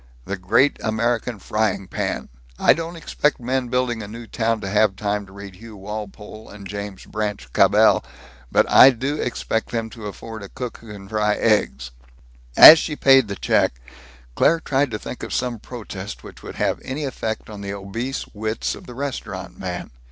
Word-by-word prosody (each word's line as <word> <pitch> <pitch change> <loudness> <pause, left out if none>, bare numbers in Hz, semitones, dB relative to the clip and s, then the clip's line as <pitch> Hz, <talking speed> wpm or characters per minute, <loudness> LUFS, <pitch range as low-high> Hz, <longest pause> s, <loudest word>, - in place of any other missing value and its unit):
The 100 - -3
Great 110 +9 +2
American 115 +1 -1
Frying 105 -1 -1
Pan! - - -3 0.3
I - - +5
don't 165 +1 -5
expect 150 -2 -1
men 125 +1 -1
building 125 -2 -1
a 105 - -7
new 115 +3 -9
town 115 0 -1
to 100 - -5
have 105 0 +2
time 105 0 -2
to - - -16
read 100 -1 -10
Hugh 110 0 -12
Walpole 105 +1 -8
and 100 -1 -10
James 100 -1 -7
Branch 105 - -4
Cabell, - - +5 0.5
but - - +3
I 130 - +9
do 135 +4 -2
expect 110 -2 -2
them 115 -1 -3
to 110 -3 -8
afford 110 +2 -8
a 100 - -9
cook 125 -2 -6
who 115 -2 -12
can 100 -2 -10
fry 105 0 +1
eggs!" 105 - +1 0.7
As 160 - +12
she 150 - -3
paid 135 -4 +5
the 100 - -4
check, - - +1 0.5
Claire 165 - +3
tried 140 -2 0
to 105 - -3
think 125 - -8
of - - -6
some 125 -3 -2
protest 105 -4 -8
which - - -12
would - - -9
have - - -1
any 140 +3 -4
effect 110 -4 -4
on 105 -2 -9
the 100 0 -5
obese 115 +7 -4
wits 110 +1 -2
of - - -12
the 125 - -10
restaurant 110 -9 -5
man. 90 -2 -5
110 Hz, 185 wpm, -22 LUFS, 100-125 Hz, 0.7 s, As